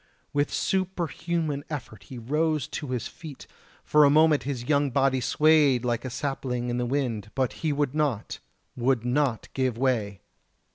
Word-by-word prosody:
With 145 0 +1
a - - -9
superhuman 170 -5 -1
effort 125 -9 -7
he 130 - -9
rose 150 +4 0
to 150 - -5
his 125 -3 -3
feet, 155 -4 -11 0.4
for 150 0 +5
a 140 - +6
moment 155 0 +5
his 125 -4 -3
young 145 -1 +2
body 135 0 +2
swayed 150 -3 +3
like 120 -1 -1
a 130 - -4
sapling 125 -2 -3
in 120 - -1
the 120 - -1
wind; 120 -6 -2
but 130 -2 0
he 160 - +1
would 145 -2 0
not 145 -8 -1 0.4
would 125 -1 +1
not 125 -2 0
give 130 -3 0
way! 110 -7 0
135 Hz, 165 wpm, -26 LUFS, 125-150 Hz, 0.4 s, a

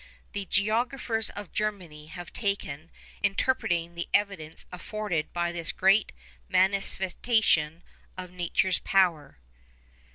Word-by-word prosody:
The 200 -2 -3
geographers 225 +3 0
of 205 -2 -8
Germany 180 -8 -3
have 175 +2 -9
taken 200 -7 -1
a - - -2
special 155 +4 -15
interest - - -22
in - - +2
interpreting 175 -9 0
the 170 0 -4
evidence 190 -6 -1
afforded 180 -3 -3
by 175 0 0
this 170 -1 -4
great 195 +3 +4 0.4
manifestation 190 -3 +2 0.3
of 180 -1 -6
nature's 180 +1 +1
powers. 175 -7 +2
185 Hz, 125 wpm, -28 LUFS, 170-205 Hz, 0.4 s, great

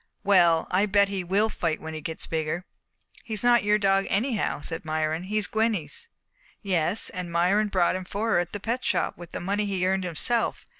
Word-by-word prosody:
"Well, 175 -5 +4
I 195 +3 +3
bet 200 0 +3
he 195 -2 -3
will 195 +5 +2
fight 165 -6 -2
when 160 0 -7
he 155 - -6
gets 160 +2 -5
bigger." 160 +2 -3 0.6
"He's 220 -3 -3
not 240 -1 +5
your 210 0 +3
dog 195 -1 +2
anyhow," 215 - 0
said 165 +2 -3
Myron. 155 +1 -1
"He's 210 +3 0
Gwenny's." 220 - -1 0.5
"Yes, 185 +1 +1
and 180 -2 -5
Myron 185 +5 +2
bought 185 -3 +1
him 185 0 -5
for 215 +4 -2
her - - +4
at 175 0 -3
the 205 - -5
Pet 235 +5 -2
Shop - - 0
with 175 -1 -8
money 200 +3 -1
he 190 -2 -1
earned 190 0 +1
himself. 200 +7 -1
190 Hz, 195 wpm, -26 LUFS, 170-210 Hz, 0.6 s, not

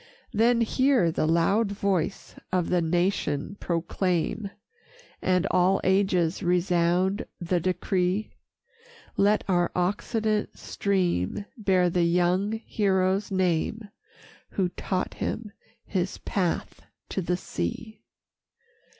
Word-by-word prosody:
Then 235 +2 +3
hear 255 -5 +3
the 155 - 0
loud 195 +6 +2
voice 200 -3 -1 0.2
of 180 -2 +1
the 180 -1 +2
nation 175 -1 0
proclaim 180 +3 -1 0.7
And 185 0 +2
all 185 +2 +3
ages 190 -3 +2
resound 180 +2 +1
the 175 +1 0
decree: 185 +3 0 0.8
Let 205 +1 +3
our 175 -2 +2
occident 210 +4 -1
stream 185 - -1
bear 190 -5 +2
the 175 - +1
young 180 +4 +2
hero's 190 -1 +1
name, 190 +3 0 0.6
Who 185 -3 0
taught 185 +1 -3
him 220 -2 -4 0.3
his 185 -1 -2
path 180 -4 -2 0.3
to 195 - -2
the 180 0 -1
sea. 215 - -5
185 Hz, 100 wpm, -26 LUFS, 175-200 Hz, 0.8 s, Then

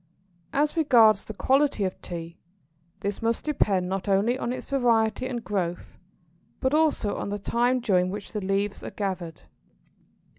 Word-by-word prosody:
] 170 -1 -38
As 300 - -2
regards 230 -10 +5
the 220 - -7
quality 270 -2 +2
of 185 -1 -3
Tea, 170 -1 -7 0.6
this 200 0 -3
must 230 0 -1
depend 200 -11 +1
not 195 +2 -3
only 200 +5 +3
on 245 -2 -3
its 255 - -6
variety 235 -3 +2
and 240 -3 -4
growth, 180 -5 -3 0.6
but 260 +1 0
also 305 -9 +2
on - - -4
the 205 - -2
time 240 +5 +1
during 185 -6 +2
which 200 +2 -6
the 210 - -3
leaves 195 +1 -1
are - - -6
gathered. 185 -5 -4
210 Hz, 160 wpm, -26 LUFS, 190-245 Hz, 0.6 s, regards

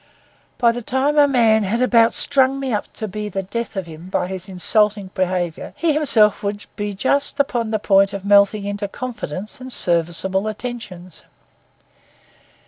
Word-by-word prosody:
By 235 -1 +4
the 240 +1 -5
time 270 +5 +1
a 290 - +6
man 230 -5 +3
had 210 +3 -1
about 235 -2 +4
strung 270 -1 +2
me 265 -3 -3
up 210 - -3
to 220 - -5
be 210 +1 -5
the 195 0 -3
death 230 +4 -5
of 190 -2 -3
him 165 +2 -11
by - - -1
his 190 +1 -7
insulting 200 +1 +1
behaviour, 180 -3 -2
he 330 -2 +1
himself 230 -9 +4
would 205 +1 -4
be 205 -1 -4
just 280 +7 0
upon 240 -5 0
the 220 - 0
point 195 -1 +3
of 200 -1 -7
melting 200 0 +4
into 205 0 -3
confidence 215 - -6
and 260 0 -8
serviceable 175 +2 0
attentions. 210 -6 -7
210 Hz, 165 wpm, -20 LUFS, 190-245 Hz, -, a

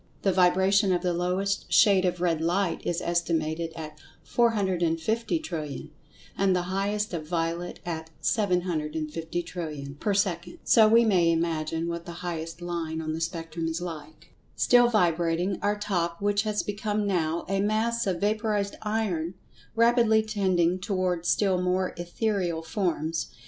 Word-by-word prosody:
The 195 - +3
vibration 190 +2 +4
of 175 0 +1
the 180 -1 +1
lowest 185 +3 -1
shade 195 -3 +5
of 180 -1 0
red 165 -3 +1
light 175 +2 0
is 175 0 -1
estimated 165 -1 -1
at 155 -2 -8 0.3
450,000,000,000,000, 190 - 0 0.5
and 195 -1 +2
the 180 - 0
highest 205 +1 -1
of 155 -3 -4
violet 170 +1 -2
at 160 -2 -4
750,000,000,000,000 160 -5 -2
per 205 -2 0
second, 195 - -1
so 220 -2 +6
we 230 +2 +5
may 180 -6 +4
imagine 165 0 -1
what 170 0 -5
the 170 - -6
highest 165 0 -5
line 165 -2 -3
on 155 -1 -3
the 160 - -4
spectrum 165 0 -3
is 165 +1 -2
like. 160 -1 -8 0.2
Still 245 -1 +5
vibrating, 175 -2 +1
our 205 +1 +1
Top, 175 -5 -2
which 205 0 +1
has 210 -1 -1
become 210 0 -2
now 170 -4 0
a 195 0 0
Mass 220 +2 0
of 180 -3 0
Vaporized 210 -1 0
Iron, 195 -6 -1 0.4
rapidly 230 -1 +4
tending 185 -5 +1
toward 185 -3 -1
still 190 -3 +2
more 180 +1 0
ethereal 175 -1 -2
forms. 165 -2 -1
180 Hz, 140 wpm, -27 LUFS, 165-205 Hz, 0.5 s, so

